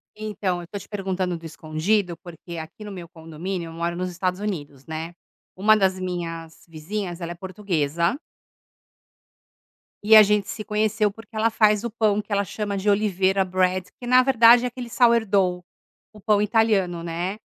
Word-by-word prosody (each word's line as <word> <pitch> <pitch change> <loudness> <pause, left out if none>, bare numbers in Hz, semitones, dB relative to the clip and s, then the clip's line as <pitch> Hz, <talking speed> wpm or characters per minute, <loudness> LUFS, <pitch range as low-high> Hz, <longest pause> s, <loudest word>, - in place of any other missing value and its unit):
Então, 210 -4 -3
eu 170 - -11
tô 205 - -6
te 195 - -10
perguntando 190 -3 -2
do 165 - -13
escondido, 165 +4 -1
porque 170 0 -10
aqui 160 +6 -9
no 210 - -7
meu 180 -3 -8
condomínio, 165 +2 -6
eu - - -10
moro 170 +1 -2
nos 180 +1 -3
Estados 180 +1 -2
Unidos, 145 -10 -5
né, 160 +2 -6 0.4
uma 210 +3 +4
das 190 -2 +1
minhas 165 -3 -6
vizinhas, 175 +3 -5
ela 170 0 -4
é - - -6
portuguesa 170 - -1 1.9
E 220 +1 +7
a 215 - +11
gente 210 -1 +1
se 215 - -5
conheceu 210 0 +1
porque 225 +2 -15
ela 225 +1 +2
faz 215 -1 +3
o 235 - -2
pão 215 -2 +1
que - - -18
ela 200 0 +2
chama 205 +2 -4
de 200 +1 0
oliveira 195 -2 +2
bread, 185 0 0
que 245 - -8
na 255 +1 +6
verdade 240 -2 +6
é - - +1
aquele 245 0 -7
sourdough, 215 -7 +2 0.5
o 215 - -15
pão 210 0 +2
italiano, 205 -5 +1
né, 175 +4 -3
190 Hz, 175 wpm, -23 LUFS, 175-215 Hz, 1.9 s, a